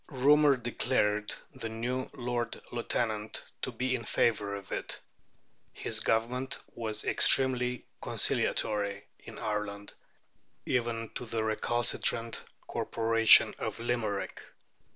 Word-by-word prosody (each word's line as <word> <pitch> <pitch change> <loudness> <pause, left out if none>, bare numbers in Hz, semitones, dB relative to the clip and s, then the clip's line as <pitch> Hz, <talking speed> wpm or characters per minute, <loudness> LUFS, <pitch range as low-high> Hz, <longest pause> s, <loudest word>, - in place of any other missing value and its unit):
Rumour 145 +1 +5
declared 105 -3 0 0.2
the 115 - -5
new 125 +3 -2
Lord 120 -2 -3
Lieutenant 110 -2 -2 0.2
to 130 - -2
be 125 +2 -1
in 120 -2 -2
favour 105 -3 +1
of 100 -1 -9
it. - - -4 0.7
His - - 0
government 125 +4 0 0.2
was 110 -2 -3
extremely 125 -2 +3 0.2
conciliatory 100 -1 0
in - - -11
Ireland, 105 -1 -4 0.7
even 115 -2 -1
to 125 - -6
the 110 -1 -1
recalcitrant 115 +1 0 0.2
corporation 115 0 +5
of - - -4
Limerick. 115 -4 -2
115 Hz, 105 wpm, -30 LUFS, 110-125 Hz, 0.7 s, Rumour